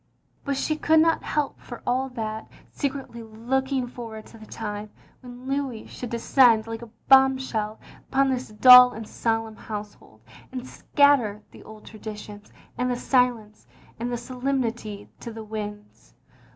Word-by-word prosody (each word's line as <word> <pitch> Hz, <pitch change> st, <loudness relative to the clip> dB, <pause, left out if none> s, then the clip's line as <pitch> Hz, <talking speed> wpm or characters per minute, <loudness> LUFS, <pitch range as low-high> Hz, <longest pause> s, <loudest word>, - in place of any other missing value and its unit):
But 280 Hz, -1 st, -2 dB
she 310 Hz, +2 st, -1 dB
could 315 Hz, +1 st, +4 dB
not 325 Hz, +1 st, +3 dB
help, 295 Hz, -2 st, -2 dB
for 240 Hz, -, -10 dB
all 260 Hz, +2 st, 0 dB
that, 220 Hz, -3 st, -5 dB, 0.2 s
secretly 270 Hz, -4 st, -4 dB
looking 255 Hz, +4 st, -2 dB
forward 230 Hz, -3 st, -9 dB
to 225 Hz, -, -15 dB
the 215 Hz, -, -13 dB
time 210 Hz, -1 st, -6 dB, 0.3 s
when 250 Hz, 0 st, -11 dB
Louis 270 Hz, -5 st, -2 dB
should 245 Hz, -, -8 dB
descend 235 Hz, -1 st, +4 dB
like 225 Hz, 0 st, -6 dB
a 235 Hz, -, -9 dB, 0.2 s
bombshell 260 Hz, -5 st, +3 dB, 0.3 s
upon 270 Hz, 0 st, +2 dB
this 255 Hz, 0 st, -2 dB
dull 250 Hz, +3 st, +9 dB
and 220 Hz, -1 st, -8 dB
solemn 225 Hz, -1 st, -2 dB
household, 210 Hz, -1 st, -9 dB, 0.3 s
and 255 Hz, -1 st, -6 dB
scatter 255 Hz, -10 st, +2 dB
the -, -, -14 dB
old 215 Hz, -1 st, -13 dB
traditions 210 Hz, -1 st, -9 dB, 0.3 s
and 250 Hz, 0 st, +1 dB
the 245 Hz, -, 0 dB
silence 245 Hz, -5 st, 0 dB, 0.3 s
and 240 Hz, +1 st, -3 dB
the 240 Hz, -, -1 dB
solemnity 240 Hz, -4 st, -3 dB
to 235 Hz, -, -7 dB
the 225 Hz, 0 st, -8 dB
winds. 210 Hz, -1 st, -8 dB
235 Hz, 150 wpm, -25 LUFS, 220-265 Hz, 0.3 s, dull